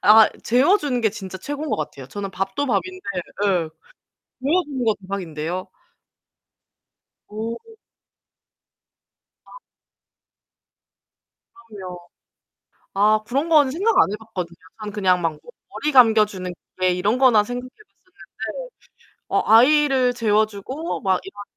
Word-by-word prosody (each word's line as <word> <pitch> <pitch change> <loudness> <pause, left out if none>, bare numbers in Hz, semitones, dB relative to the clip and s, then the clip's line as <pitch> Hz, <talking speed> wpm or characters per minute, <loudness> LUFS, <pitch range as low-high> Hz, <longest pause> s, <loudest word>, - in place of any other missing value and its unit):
아 215 +1 +8
재워 270 - +4
주는 260 -4 -1
게 220 -2 +2
진짜 190 -3 -8
최고인 290 +9 -5
것 - - +1
같아요. 140 -4 -6
저는 200 +2 -5
밥도 195 +9 -2
밥인데 370 - -2 0.4
예. - - +3 1.0
재워 340 +7 +2
주는 265 -4 -4
거 220 - +3
대박인데요. 180 -2 -5 1.6
어. 220 +2 -4 1.9
아. - - -14 2.1
그럼요. 185 -4 -8 1.0
아 215 +2 +4
그런 280 +6 -1
거는 295 -5 +5
생각 395 +8 +1
안 - - +5
해 210 - -2
봤거든요. 185 -6 -7 0.2
앙 215 -1 -6
그냥 190 -4 +2
막 160 -2 -1 0.3
머리 300 - -2
감겨 225 -4 +7
주는 185 -3 -6 0.2
기계 185 0 +2
이런 200 +7 0
거나 240 -6 +5
생각해 245 +2 -5
봤었는데 370 - -10 0.6
어 - - +1
아이를 260 +1 +5
재워 215 -2 +2
주고 255 - -5
막 190 -2 +1
이런 205 +1 -9
220 Hz, 235 characters per minute, -22 LUFS, 195-270 Hz, 2.1 s, 아